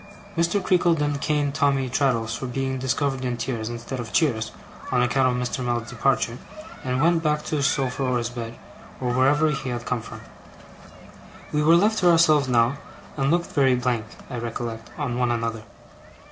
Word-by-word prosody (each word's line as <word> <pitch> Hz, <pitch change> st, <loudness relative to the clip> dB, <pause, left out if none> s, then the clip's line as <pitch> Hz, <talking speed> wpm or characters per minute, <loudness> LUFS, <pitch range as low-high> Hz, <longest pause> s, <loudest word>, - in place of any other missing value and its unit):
Mr. 170 Hz, +4 st, +2 dB
Creakle 180 Hz, -2 st, +3 dB
then 145 Hz, -1 st, 0 dB
caned 145 Hz, -1 st, 0 dB
Tommy 140 Hz, -3 st, +2 dB
Traddles 120 Hz, -3 st, 0 dB
for 130 Hz, -, -5 dB
being 130 Hz, +1 st, -2 dB
discovered 130 Hz, +1 st, -1 dB
in 125 Hz, -1 st, -2 dB
tears, 115 Hz, -2 st, -3 dB
instead 120 Hz, +2 st, -5 dB
of 115 Hz, -2 st, -6 dB
cheers, 110 Hz, -9 st, +1 dB, 0.4 s
on 125 Hz, -1 st, +3 dB
account 130 Hz, +1 st, +2 dB
of 125 Hz, -, 0 dB
Mr. 130 Hz, -, -4 dB
Mell's 120 Hz, -1 st, -2 dB
departure; 120 Hz, -1 st, 0 dB, 0.4 s
and 125 Hz, -1 st, -1 dB
went 165 Hz, 0 st, +3 dB
back 150 Hz, -1 st, 0 dB
to 155 Hz, -, -2 dB
his 140 Hz, -1 st, +2 dB
sofa, 135 Hz, -1 st, -1 dB
or 125 Hz, -2 st, +1 dB
his 120 Hz, -1 st, -2 dB
bed, 115 Hz, -1 st, -6 dB, 0.4 s
or 125 Hz, -1 st, -1 dB
wherever 145 Hz, +4 st, +3 dB
he 135 Hz, -2 st, -3 dB
had 120 Hz, 0 st, -4 dB
come 125 Hz, -2 st, -1 dB
from. 115 Hz, -, -10 dB, 1.3 s
We 150 Hz, -, +1 dB
were 160 Hz, +3 st, +6 dB
left 210 Hz, +5 st, +3 dB
to 180 Hz, -, +4 dB
ourselves 155 Hz, -4 st, +5 dB
now, 125 Hz, +2 st, +2 dB, 0.4 s
and 135 Hz, -1 st, 0 dB
looked 170 Hz, +2 st, +1 dB
very 135 Hz, -3 st, +3 dB
blank, 125 Hz, -3 st, -1 dB, 0.2 s
I 125 Hz, -3 st, -5 dB
recollect, 115 Hz, -1 st, -5 dB
on 125 Hz, -5 st, -2 dB
one 125 Hz, -1 st, +2 dB
another. 115 Hz, -1 st, -2 dB
130 Hz, 185 wpm, -24 LUFS, 120-145 Hz, 1.3 s, were